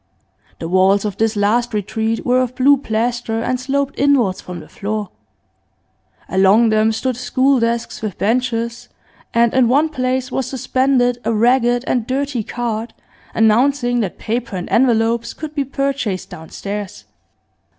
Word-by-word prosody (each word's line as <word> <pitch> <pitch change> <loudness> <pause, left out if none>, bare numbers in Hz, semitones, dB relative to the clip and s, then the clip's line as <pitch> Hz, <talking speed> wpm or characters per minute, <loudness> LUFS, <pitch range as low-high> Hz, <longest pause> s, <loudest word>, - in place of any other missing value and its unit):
The 165 - -5
walls 190 +3 +3
of 205 -3 -3
this 225 0 +1
last 220 +3 +1
retreat 220 +2 -2
were 255 +1 +3
of 255 0 -3
blue 275 +3 +5
plaster 235 -2 -2
and 250 +2 -1
sloped 275 +2 -2
inwards 260 -9 +2
from 180 -1 -8
the - - -12
floor; 210 -1 -4 1.2
along 195 +5 +4
them 215 0 +3
stood 255 +3 -2
school 255 +2 +1
desks 230 0 -2
with 215 -4 -4
benches, 235 +1 -1 0.4
and 235 0 +2
in 255 -2 +4
one 290 +6 +3
place 255 -2 -2
was 265 - -2
suspended 255 -1 +1
a 230 - 0
ragged 240 +2 +2
and 240 -2 -1
dirty 270 -1 -1
card 230 0 -4 0.4
announcing 245 +3 +3
that 200 -6 -3
paper 230 -2 -3
and 180 -1 -4
envelopes 235 -1 +2
could 305 -1 -7
be 285 -2 0
purchased 275 -9 -2
downstairs. 180 - -7
235 Hz, 145 wpm, -18 LUFS, 215-255 Hz, 1.2 s, blue